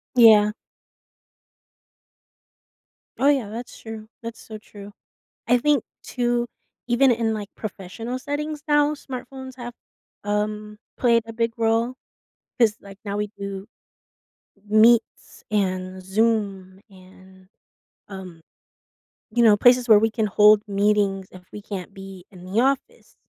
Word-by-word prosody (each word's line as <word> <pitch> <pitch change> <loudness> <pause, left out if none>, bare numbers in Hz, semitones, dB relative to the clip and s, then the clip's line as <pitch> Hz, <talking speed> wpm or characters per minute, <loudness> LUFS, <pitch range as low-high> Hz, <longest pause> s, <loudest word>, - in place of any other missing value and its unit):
Yeah. 215 -3 +7 2.7
Oh, 275 - +3
yeah, 265 -8 +1
that's 235 +3 -8
true. 220 -1 -9
That's 230 0 -7
so 215 -1 -9
true. 205 -1 -13 0.6
I 245 +1 +5
think, 290 -1 +2 0.2
too, 240 -1 -1 0.4
even 245 +2 +4
in, 225 -2 +1
like, 205 -2 -5
professional 215 +4 -6
settings 295 +2 -4
now, 295 0 +3
smartphones 260 -1 -8
have, 240 -1 -8 0.5
um, 210 0 -3 0.2
played 235 -2 +3
a 225 - -7
big 230 0 -1
role 230 +2 +1 0.6
'cause, 225 -3 +3
like, 195 -1 -13
now 200 -1 -3
we 210 0 -2
do 200 0 -6 1.0
Meets 220 +2 +2
and 185 -2 -2
Zoom 195 -2 -1
and, 185 0 -18 0.6
um, 185 -4 -10 0.9
you 240 - +2
know, 215 -2 +6
places 245 +2 +5
where 215 -2 +7
we 225 +1 +2
can 220 0 0
hold 210 +1 +5
meetings 200 -1 +1
if 185 -1 -13
we 210 - -8
can't 200 -2 -7
be 195 -2 -11
in 180 -2 -13
the 190 +4 -1
office. 270 +1 -2
215 Hz, 125 wpm, -23 LUFS, 200-240 Hz, 2.7 s, Yeah